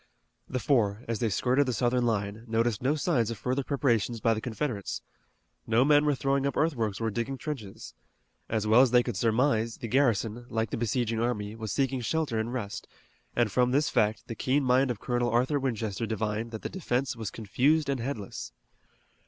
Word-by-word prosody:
The 130 - -2
four, 115 -5 +1
as 115 -2 -2
they 115 - +1
skirted 130 +7 +2
the 125 - 0
Southern 120 +1 +1
line, 105 -1 -2
noticed 115 -1 0
no 135 +4 +2
signs 135 -7 +1
of 115 - -4
further 130 +6 -1
preparations 120 -5 0
by 115 +2 +3
the 110 - -3
Confederates. 115 -3 -3 0.6
No 115 +3 +4
men 145 0 +5
were 145 -1 +2
throwing 135 +1 +1
up 140 - -3
earthworks 115 -10 0
or 115 -1 -1
digging 120 +5 -3
trenches. 125 -10 -7 0.6
As 110 -2 0
well 110 +3 +6
as 130 - +5
they 120 0 +5
could 120 -4 -4
surmise, 115 +1 +1
the 115 - -5
garrison, 120 -2 +1
like 110 -1 -1
the - - -1
besieging 115 0 0
army, 110 -3 -2
was 110 -2 -5
seeking 135 0 0
shelter 140 -2 -1
and 110 +2 -2
rest, 110 -5 -5 0.5
and 120 -4 +2
from 125 +2 +3
this 140 +4 +2
fact 105 +1 +1
the - - -4
keen 130 +5 +1
mind 130 +1 +3
of 120 -5 -2
Colonel 120 -1 0
Arthur 125 +5 +2
Winchester 115 -5 -2
divined 110 +1 -2
that 110 -2 -7
the - - -1
defense 135 -9 -1
was 110 -4 -4
confused 135 +8 +1
and 140 -2 -1
headless. 100 - -5
120 Hz, 195 wpm, -28 LUFS, 110-130 Hz, 0.6 s, well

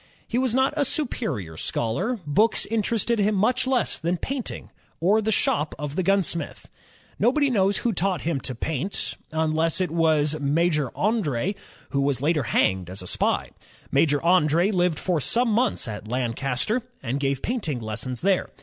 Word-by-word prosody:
He 240 - 0
was 255 -2 +1
not 265 +2 +2
a 295 - +2
superior 220 - -2
scholar. 120 - -1
Books 205 +10 +2
interested 225 +1 0
him 210 +1 +2
much 220 +6 +1
less 260 -2 0
than 175 +2 -1
painting 265 +5 -5 0.3
or 200 +6 +3
the 220 +1 0
shop 150 -6 +1
of 150 -1 -5
the 185 - +1
gunsmith. 185 -4 0 0.5
Nobody 270 +6 +3
knows 200 -3 +2
who 235 - 0
taught 185 -1 0
him 160 -4 -1
to 130 - -3
paint, 160 - -2 0.2
unless 160 +1 +1
it 180 -4 0
was 155 -2 +2
Major 150 -1 +1
Andr6, 195 - 0 0.4
who 140 - +1
was 140 -2 +1
later 150 +2 +1
hanged 95 -6 +1
as 95 0 -6
a - - -7
spy. - - 0 0.4
Major 145 -2 +3
Andr^ 170 +2 +3
hved 175 -3 +1
for 175 -2 0
some 240 - +2
months 230 - +1
at 105 -1 -6
Lancaster 125 - -1 0.2
and 130 +4 -2
gave 140 -1 -1
painting 200 - -2
lessons 115 +3 -4
there. 190 0 +1
170 Hz, 165 wpm, -24 LUFS, 140-215 Hz, 0.5 s, or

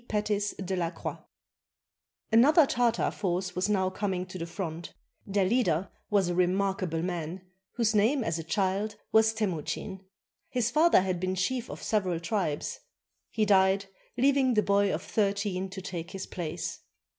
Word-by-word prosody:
PETIS 210 -1 -1
DE 190 0 -3
LA 170 -2 0
CROIX - - -6 1.1
[Another 285 +8 +6
Tartar 240 -3 +1
force 185 -1 -2
was 185 +3 0
now 190 -2 +1
coming 190 -2 -2
to 185 0 -8
the 165 - -4
front. 170 -2 -6 0.3
Their 200 -1 +1
leader 195 -5 +1 0.2
was 200 -3 +3
a 175 - 0
remarkable 185 -2 0
man 175 0 -4 0.3
whose 230 -3 +1
name 230 +6 +3
as 165 -4 -1
a - - -4
child 195 +5 -1 0.2
was 220 0 +5
Temuchin. 190 -2 -3 0.5
His 240 -2 0
father 315 - +5
had 185 -2 -1
been 185 +1 -1
chief 240 +6 -1
of - - -8
several 185 -6 0
tribes. 170 -5 -2 0.5
He 220 -1 +1
died, 195 0 +4 0.3
leaving 265 -1 +3
the 210 - +4
boy 200 0 +3
of 160 +5 -3
thirteen 200 -3 -1
to 190 0 -8
take 175 -3 -5
his 190 -1 -6
place. 170 -1 -5
195 Hz, 155 wpm, -29 LUFS, 180-215 Hz, 1.1 s, Another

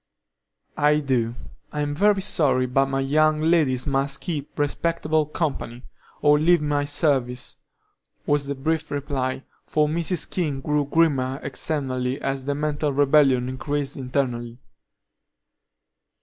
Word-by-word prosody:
"I 150 0 +4
do. 125 -5 0 0.4
I'm 145 -1 -2
very 200 +4 +2
sorry, 145 -9 +2
but 135 +2 +2
my 135 0 -1
young 155 +3 +2
ladies 155 -6 +2
must 140 -1 -1
keep 155 -6 -5
respectable 155 +1 0
company, 135 -6 -3 0.4
or 150 0 +5
leave 170 +3 +4
my 145 -1 0
service," 135 -4 -1 0.7
was 145 -1 +1
the 140 - -2
brief 155 +3 -2
reply, 135 -2 -3 0.2
for 150 -1 +2
Mrs. 170 +3 0
King 150 -7 -2
grew 150 +1 0
grimmer 140 -4 +1
externally 135 -3 -2
as 135 -1 -3
the 140 0 -1
mental 150 0 -1
rebellion 135 -2 +3
increased 140 +2 -3
internally. 125 -3 -2
145 Hz, 120 wpm, -24 LUFS, 135-155 Hz, 0.7 s, or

